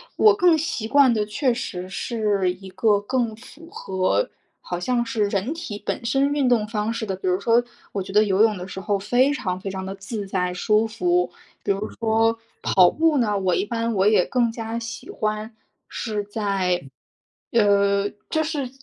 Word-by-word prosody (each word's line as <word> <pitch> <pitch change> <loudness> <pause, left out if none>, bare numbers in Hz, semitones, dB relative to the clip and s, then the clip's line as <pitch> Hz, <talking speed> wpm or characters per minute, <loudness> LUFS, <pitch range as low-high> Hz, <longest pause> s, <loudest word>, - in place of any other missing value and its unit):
我 425 -1 +6
更 355 -5 +4
习 265 -8 -2
惯 275 -1 +5
的 215 -2 0
确 245 +5 0
实 185 -7 -5
是 200 -3 0
一 190 +1 -12
个 200 +2 +2
更 235 0 -1
符 255 +8 -14
合， 190 - -1 0.3
好 175 - -4
像 240 +5 0
是 225 -2 0
人 200 +7 -1
体 330 -12 -7
本 235 - -3
身 275 +4 +2
运 285 -3 +1
动 235 -4 +3
方 215 0 -2
式 230 -1 -3
的， 195 - -3
比 185 - -5
如 180 0 +2
说， 230 +3 +3 0.3
我 200 - -1
觉 195 - -9
得 210 +1 +6
游 200 0 +3
泳 215 -2 +3
的 180 0 -7
时 190 - -7
候 200 +1 0
非 245 +8 +2
常 185 -10 -3
非 195 +1 -5
常 190 0 -5
地 190 - -4
自 200 +2 -5
在 180 -2 -1
舒 215 +4 +2
服。 350 +11 +1 0.3
比 - - +2
如 200 +2 -2
说 225 0 +2 0.2
跑 180 -2 +5
步 320 -1 +2
呢， 210 -5 +1
我 185 -3 +1
一 - - 0
般 230 +1 -2
我 195 +1 +3
也 210 -4 +5
更 240 -3 +1
加 225 0 -5
喜 230 0 -7
欢 215 +1 -3 0.3
是 210 -2 -3
在， 195 -4 -1 0.7
呃， 200 -2 +3 0.2
就 315 0 +1
是， 295 -5 -3
215 Hz, 205 characters per minute, -23 LUFS, 195-240 Hz, 0.7 s, 我